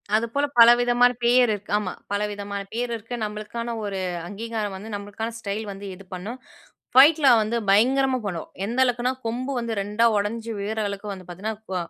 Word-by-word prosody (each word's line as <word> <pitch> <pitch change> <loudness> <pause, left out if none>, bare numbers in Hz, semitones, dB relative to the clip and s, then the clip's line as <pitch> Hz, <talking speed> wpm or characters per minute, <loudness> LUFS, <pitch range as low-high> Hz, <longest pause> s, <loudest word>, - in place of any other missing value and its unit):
அதுப்போல 235 +6 +1
பலவிதமான 240 +1 +6
பேர் 245 +2 +5
இருக்கு. 205 0 -7
ஆமா. 200 -3 -2 0.2
பலவிதமான 205 -1 -3
பேர் 240 +1 -2
இருக்கு. 225 +2 -6
நம்மளுக்கான 215 +3 -4
ஒரு 195 -2 -3 0.3
அங்கீகாரம் 215 0 -4
வந்து, 210 +3 -8
நம்பளுக்கான 205 +3 -5
ஸ்டைல் 210 +1 -4
வந்து 195 +1 -9
இது 195 +1 -14
பண்ணும். 205 +8 -6 0.6
ஃபைட்ல 290 +2 +7
வந்து 215 +2 -1
பயங்கரமா 260 +6 +4
பண்ணுவோம். 175 -5 -5
எந்த 235 +5 -2
அளவுக்குன்னா 245 0 +1
கொம்பு 250 +4 -2
வந்து 235 -1 -3
2ஆ 210 +3 +1
உடைஞ்சி 220 +3 -2
விழுற 215 +2 -3
அளவுக்கு 200 +1 -5
வந்து 185 -2 -11
பாத்தீங்கன்னா, 205 +5 -4 0.2
வ - - -2
220 Hz, 160 wpm, -24 LUFS, 205-240 Hz, 0.6 s, ஃபைட்ல